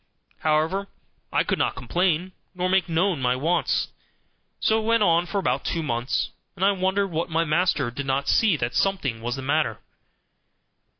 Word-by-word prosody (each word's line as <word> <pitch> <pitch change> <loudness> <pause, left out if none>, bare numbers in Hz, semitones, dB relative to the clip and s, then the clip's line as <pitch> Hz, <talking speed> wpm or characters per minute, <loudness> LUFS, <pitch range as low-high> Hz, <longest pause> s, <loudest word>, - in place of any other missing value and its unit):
However, 160 +6 +1 0.4
I - - +2
could - - -1
not - - +1
complain, 175 +7 0 0.2
nor 180 0 0
make 190 -1 +2
known 165 -2 +1
my 125 0 +2
wants. 165 +7 0 0.7
So 220 0 +2
it - - -6
went 230 -1 +4
on 170 -1 +3
for 200 - -3
about 135 -8 0
two 165 - -2
months; 120 -3 -1 0.2
and 190 0 0
I 200 - +5
wondered 190 0 0
that 165 +2 -1
my 165 +1 +1
master 155 -5 +1
did 135 +3 -5
not 135 +1 0
see 210 -8 +3
that 120 -2 -2
something 140 -13 0
was 120 +2 -2
the 135 - -6
matter. 135 - +1
165 Hz, 175 wpm, -24 LUFS, 140-190 Hz, 0.7 s, I